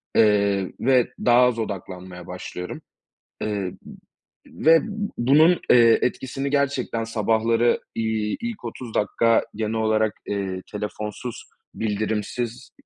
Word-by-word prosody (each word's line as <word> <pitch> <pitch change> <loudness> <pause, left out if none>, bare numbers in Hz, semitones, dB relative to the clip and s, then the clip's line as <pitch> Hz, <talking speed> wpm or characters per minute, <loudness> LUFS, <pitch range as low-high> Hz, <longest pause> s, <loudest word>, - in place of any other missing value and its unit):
eee, 100 -3 +3
ve 125 -1 +3 0.2
daha 120 0 +6
az 125 -2 +3
odaklanmaya 90 -4 -6
başlıyorum, 90 0 -7 0.6
eee, 100 -4 -2 0.7
v - - -9
ve 165 0 +8 0.4
bunun, 155 +8 +5
eee, 115 -2 +7
etkisini 135 +2 -2
gerçekten 135 -5 0
sabahları, 115 +1 +1
iii, 110 -1 -1
ilk 235 - -5
30 115 0 -7
dakika 115 +2 +2
genel 110 0 -2
olarak, 110 -1 +1
eee, 95 -2 -3
telefonsuz, 105 +3 -5 0.3
bildirimsiz, 110 +3 -3
110 Hz, 105 wpm, -23 LUFS, 105-125 Hz, 0.7 s, ve